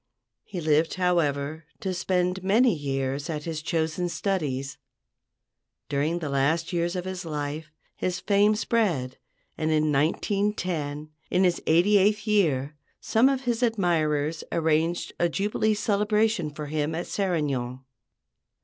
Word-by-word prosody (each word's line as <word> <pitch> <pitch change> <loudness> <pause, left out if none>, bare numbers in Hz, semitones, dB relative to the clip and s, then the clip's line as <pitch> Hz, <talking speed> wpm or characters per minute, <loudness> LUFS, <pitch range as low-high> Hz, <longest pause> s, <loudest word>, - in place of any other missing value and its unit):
He 190 - -6
lived, 155 +1 +2
however, 160 -4 0 0.2
to 190 -4 -2
spend 180 0 0
many 225 +5 +4
years 140 0 -2
at 150 -2 -3
his 160 -1 -4
chosen 165 +2 -1
studies. 140 -9 -2 1.1
During 145 +4 0
the 155 -4 -4
last 150 +6 +1
years 170 +1 0
of 180 0 -3
his 185 0 -4
life 150 -1 -4 0.3
his 180 0 -2
fame 205 +1 +3
spread, 190 - 0 0.4
and 155 0 0
in 155 -1 +2
1910, 155 -1 -1 0.2
in 180 +1 +2
his 180 -2 +2
eighty 185 +6 +5
eighth 210 +2 +2
year, 155 - +1 0.2
some 235 +4 +3
of 270 -2 0
his 240 -2 -1
admirers 165 -9 +1
arranged 160 +1 0
a 175 - +3
jubilee 210 +4 0
celebration 210 -4 +1
for 150 +1 -7
him 150 +1 -2
at 170 - -3
Serignan. 140 -10 -1
170 Hz, 130 wpm, -26 LUFS, 150-195 Hz, 1.1 s, eighty